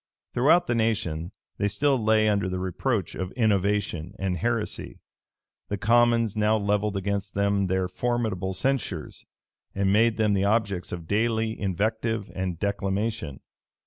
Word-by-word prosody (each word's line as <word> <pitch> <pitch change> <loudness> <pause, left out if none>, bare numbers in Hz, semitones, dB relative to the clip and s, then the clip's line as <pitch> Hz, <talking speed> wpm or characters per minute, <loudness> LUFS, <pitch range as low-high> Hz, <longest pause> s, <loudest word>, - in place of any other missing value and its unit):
Throughout 160 +8 +4
the 120 - 0
nation, 105 -8 -1 0.3
they 100 - +2
still 130 +4 +1
lay 110 0 +4
under 100 -3 +1
the 95 - -2
reproach 95 +3 -1
of 95 0 -4
innovation 100 -5 0
and 95 -1 -1
heresy. 115 +4 -2 0.7
The 100 - -2
commons 115 +1 +3
now 110 +1 +3
levelled 105 0 0
against 100 +1 -3
them 100 -1 +1
their 95 0 0
formidable 100 -3 -2
censures, 125 - -2 0.5
and 100 0 +2
made 115 +1 +3
them 110 -2 +2
the 100 -1 +1
objects 100 -4 0
of 85 -2 -6
daily 110 +2 +1
invective 110 +2 -1
and 90 -2 -3
declamation. 100 -5 -2
105 Hz, 140 wpm, -26 LUFS, 95-110 Hz, 0.7 s, Throughout